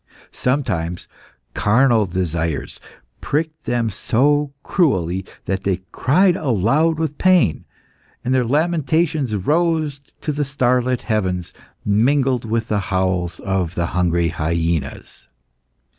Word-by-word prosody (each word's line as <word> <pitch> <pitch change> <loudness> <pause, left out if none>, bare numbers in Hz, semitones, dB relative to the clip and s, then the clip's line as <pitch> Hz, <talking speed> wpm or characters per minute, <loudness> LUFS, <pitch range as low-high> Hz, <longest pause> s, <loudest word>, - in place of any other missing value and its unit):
Sometimes 90 - -2 0.5
carnal 115 -1 +3
desires 85 -4 -2 0.4
pricked 155 +1 -2
them 115 -2 0
so 145 +8 +1
cruelly 95 - +1 0.2
that 95 0 -2
they 95 -2 -1
cried 180 +7 +3
aloud 145 - +1
with 155 -2 -3
pain, 180 - +3 0.6
and 130 - +1
their 130 -1 +3
lamentations 155 -1 +1
rose 155 - 0 0.2
to 150 - -2
the 145 0 -1
starlit 125 -2 +1
heavens 95 -5 -1 0.3
mingled 125 +4 +2
with 115 0 -1
the 105 - 0
howls 90 -3 0
of 95 -4 -1
the 85 - 0
hungry 85 -2 +1
hyaenas. 80 -2 -3
115 Hz, 110 wpm, -20 LUFS, 90-145 Hz, 0.6 s, carnal